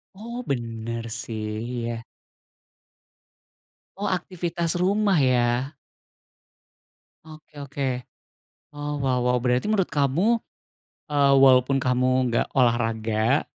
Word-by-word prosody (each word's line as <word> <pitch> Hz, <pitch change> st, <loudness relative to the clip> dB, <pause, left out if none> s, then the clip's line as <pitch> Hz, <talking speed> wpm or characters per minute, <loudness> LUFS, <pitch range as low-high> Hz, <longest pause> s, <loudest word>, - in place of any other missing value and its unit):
Oh 235 Hz, +4 st, -7 dB
bener 115 Hz, -2 st, -3 dB, 0.2 s
sih, 115 Hz, -1 st, -6 dB, 0.4 s
iya. 115 Hz, -1 st, -4 dB, 1.9 s
Oh 205 Hz, -, -2 dB
aktivitas 175 Hz, -2 st, -2 dB
rumah 200 Hz, -1 st, +2 dB
ya. 125 Hz, +1 st, +1 dB, 1.5 s
Oke 155 Hz, -1 st, -14 dB
oke. 140 Hz, -1 st, -3 dB, 0.8 s
Oh 145 Hz, 0 st, -4 dB
wow 130 Hz, -3 st, 0 dB
wow, 125 Hz, 0 st, +2 dB
berarti 125 Hz, -, 0 dB
menurut 200 Hz, -4 st, +1 dB
kamu, 170 Hz, -, +2 dB, 0.7 s
eee, 140 Hz, -1 st, +4 dB
walaupun 135 Hz, 0 st, +5 dB
kamu 130 Hz, 0 st, +2 dB
enggak 115 Hz, -, +1 dB
olahraga 115 Hz, 0 st, +2 dB
135 Hz, 95 wpm, -24 LUFS, 120-160 Hz, 1.9 s, walaupun